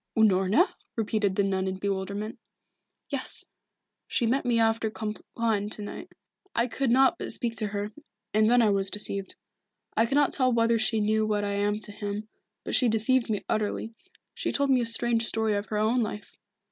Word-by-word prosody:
"Unorna?" 210 - +4 0.2
repeated 210 -3 0
the 200 - +2
nun 190 -1 0
in 190 0 -3
bewilderment. 200 +2 -3 0.7
"Yes. - - -2 0.6
She 240 - 0
met 255 +4 +1
me 240 -1 +3
after 225 0 +2
Compline 215 0 -2
to 215 - 0
night. 205 - -8 0.4
I 235 - +3
could 265 +1 -1
not 260 +2 +4
but - - -4
speak 230 -1 -2
to 215 - +1
her, 205 +1 -4 0.4
and 215 +1 +4
then 245 0 +5
I 215 - +4
was 195 -1 0
deceived. 200 -1 -2 0.6
I 225 - +3
cannot 280 +3 +2
tell 255 -2 +2
whether 230 -1 +3
she 220 0 +1
knew 215 +1 +1
what 210 -1 0
I 200 0 -1
am 205 +1 0
to 210 0 -3
him, 205 +1 -5 0.4
but - - -4
she 250 - +5
deceived 225 +3 +2
me 210 -2 -2
utterly. 215 +1 -2 0.4
She - - -2
told 280 -1 +1
me 255 -2 +4
a 235 - 0
strange 230 0 +1
story 220 -1 +2
of 205 0 -2
her 215 - -2
own 220 +4 +2
life. 210 -1 -5
220 Hz, 185 wpm, -27 LUFS, 205-230 Hz, 0.7 s, then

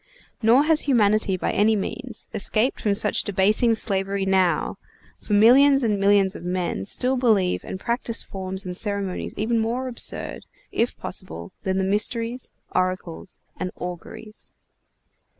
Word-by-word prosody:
Nor 240 +5 +5
has 310 0 +3
humanity, 215 -5 +3
by - - -1
any 215 +2 +3
means, 240 +4 -5
escaped 215 +3 +1
from 205 -2 +1
such 210 -1 +2
debasing 210 +4 +2
slavery 195 -2 0
now; 190 -2 +1 0.4
for 210 - -4
millions 270 +6 +6
and 210 -3 +1
millions 195 -1 +3
of - - -9
men 180 - -2
still 255 - +1
believe 215 -8 +1
and 190 - -6
practice 235 +1 -2
forms 190 0 -6
and 180 -1 -5
ceremonies 200 -2 -2
even 225 +2 0
more 240 +4 -2
absurd, 245 -2 -1 0.2
if 235 +2 -1
possible, 185 0 -4
than 190 -2 -1
the 190 - +1
Mysteries, 230 +5 -1 0.2
Oracles, 185 -1 -3 0.2
and 185 - -2
Auguries. 180 +5 -7
205 Hz, 140 wpm, -23 LUFS, 190-230 Hz, 0.4 s, millions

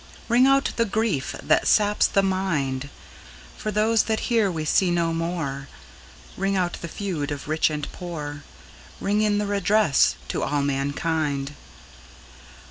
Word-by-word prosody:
Ring 245 +3 +5
out 275 0 +3
the 230 - +3
grief 210 -10 -1
that - - +2
saps 210 -1 +4
the 195 - +2
mind, 150 -9 -1 0.7
For - - -4
those 215 +1 +2
that 220 -1 -1
here 225 -4 +3
we 160 -2 -3
see 180 +4 +3
no 170 -1 +1
more, 165 -5 -3 0.7
Ring 195 +1 0
out 180 -1 -1
the 170 - -5
feud 170 -5 -4
of 145 -1 -5
rich 155 +1 +2
and 150 -1 -4
poor, 150 -5 -6 0.6
Ring 205 +1 +1
in 210 -1 +2
redress 200 -5 +3
to - - -2
all 145 -1 0
mankind. 140 +1 -1
175 Hz, 140 wpm, -24 LUFS, 145-205 Hz, 0.7 s, Ring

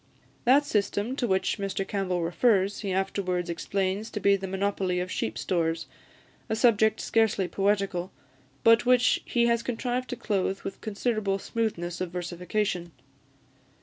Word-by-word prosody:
That 275 +4 +5
system 210 +2 0
to 245 - 0
which 190 +1 0
Mr 195 -1 -2
Campbell 185 -4 -1
refers, 195 +3 +2
he 200 -3 -3
afterwards 185 -2 -1
explains 195 +4 -2
to 210 - -4
be 200 -1 +4
the 195 0 -4
monopoly 190 -1 -1
of 180 +1 -3
sheep 110 0 -2
stores, 165 -2 -1 0.6
a 220 - +1
subject 220 -1 +3
scarcely 220 -4 +1
poetical, 195 -1 0 0.5
but 230 0 +6
which 250 0 +4
he 235 -1 +2
has 235 -1 +2
contrived 250 +1 -2
to - - -3
clothe 195 -4 -1
with 195 - -7
considerable 215 -2 -1
smoothness 185 -6 -3
of 185 - -2
versification. 180 0 -3
195 Hz, 145 wpm, -27 LUFS, 185-220 Hz, 0.6 s, but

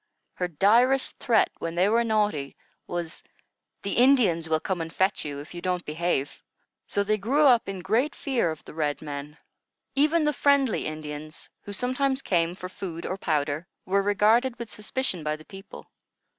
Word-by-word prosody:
Her 180 - -2
direst 230 - +3
threat, 230 -3 +3
when 165 0 -4
they 180 +3 +3
were 230 +3 +3
naughty, 210 - 0 0.3
was, 175 -1 -4 0.6
"The 200 - -2
Indians 225 -11 +4
will 160 0 +2
come 180 +1 -2
and 165 0 -5
fetch 190 +2 +1
you, 145 -2 -5
if 145 +4 -10
you 175 - -6
don't 180 -1 -1
behave." 155 -3 -2 0.5
So 200 - 0
they 215 +1 0
grew 275 +9 +3
up 240 -6 +5
in 195 -2 -5
great 230 +11 +1
fear 255 -11 0
of 160 -1 -6
the - - -10
red 150 -1 -2
men. 145 +1 -6 0.6
Even 305 +4 +3
the 300 0 +2
friendly 280 -4 +2
Indians, 155 0 -7
who 205 - -8
sometimes 260 +4 0
came 170 -1 +1
for 185 - -7
food 175 -3 -7
or 185 - -2
powder, 155 -2 -1 0.2
were 200 +1 +2
regarded 220 +5 +3
with 235 -3 -7
suspicion 210 -5 -3
by 150 0 -1
the 155 0 -14
people. 195 0 -12
190 Hz, 175 wpm, -26 LUFS, 160-235 Hz, 0.6 s, up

